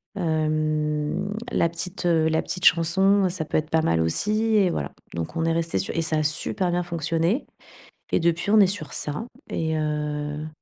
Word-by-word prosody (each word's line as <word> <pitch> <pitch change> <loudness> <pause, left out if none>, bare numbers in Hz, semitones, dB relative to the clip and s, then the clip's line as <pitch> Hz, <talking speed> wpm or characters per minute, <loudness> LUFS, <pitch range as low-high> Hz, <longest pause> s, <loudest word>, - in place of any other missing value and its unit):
Hem, 155 +1 -1 0.2
la 170 - +2
petite, 175 +2 -5
heu 160 -2 +3
la 160 0 +1
petite 180 0 -4
chanson, 190 +4 +4
ça 175 -3 -3
peut - - -1
être 155 0 -2
pas 160 0 +2
mal 80 - +2
aussi 210 - 0
et 195 -4 +4
voilà, 70 - -3 0.2
donc 85 - -4
on 165 - 0
est 165 - +2
restés 165 -7 -1
su 95 - -1
et 165 - +1
ça 160 -1 0
a 155 - +1
super 155 +4 0
bien 175 +1 +1
fonctionné, 170 - -1 0.7
et - - +3
depuis, 170 +3 0
on 215 - +6
est 200 - +7
sur 185 -5 -4
ça, 150 +10 -3 0.2
et 160 -1 -1
heu 150 0 -2
165 Hz, 190 wpm, -24 LUFS, 155-180 Hz, 0.7 s, est